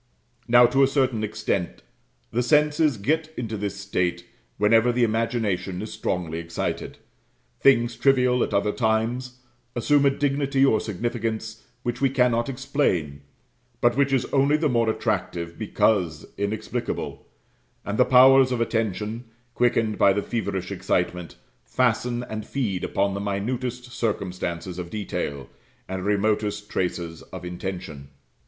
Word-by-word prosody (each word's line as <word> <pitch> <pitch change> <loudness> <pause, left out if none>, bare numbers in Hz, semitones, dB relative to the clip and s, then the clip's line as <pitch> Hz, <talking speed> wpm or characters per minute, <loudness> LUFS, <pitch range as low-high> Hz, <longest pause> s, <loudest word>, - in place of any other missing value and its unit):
Now, 120 +1 +7
to 130 +3 +2
a 135 - +6
certain 130 -5 +1
extent, 100 - -2 0.5
the 120 - +1
senses 150 +1 +3
get 155 +9 0
into 115 -3 -3
this 100 -1 -3
state 90 -3 -1 0.3
whenever 115 +3 +4
the 120 0 +1
imagination 110 -5 -1
is 110 - -7
strongly 85 -3 -2
excited. 85 0 -4 0.6
Things 120 -3 +4
trivial 125 -2 +3
at - - -3
other 100 +1 +1
times 120 +3 -1 0.3
assume 140 +4 +3
a - - +6
dignity 140 0 +1
or 110 - +3
significance 110 +1 -3 0.2
which 120 +1 -3
we 135 - +4
cannot 125 -1 +2
explain; 125 - -1 0.6
but 120 0 +3
which 140 0 +2
is 130 -2 +2
only 140 +2 +4
the 155 0 +1
more 115 -2 +2
attractive 85 -5 -2
because 90 -8 +1
inexplicable: 100 +2 -4 0.6
and 105 +1 -3
the - - +8
powers 130 +1 +6
of 125 - 0
attention, 110 0 -2 0.3
quickened 115 -3 +1
by 100 - +6
the 100 +1 -1
feverish 95 -5 -3
excitement, 90 -1 -2 0.3
fasten 120 -1 0
and 110 -3 -6
feed 105 -10 -2
upon 100 0 0
the 100 - -3
minutest 120 +5 -3
circumstances 90 -5 -3
of 85 -1 -5
detail, 70 - -4 0.4
and 95 0 -4
remotest 105 0 0
traces 85 -2 -3
of 95 -1 -9
intention. 90 -5 -6
110 Hz, 135 wpm, -24 LUFS, 95-125 Hz, 0.6 s, the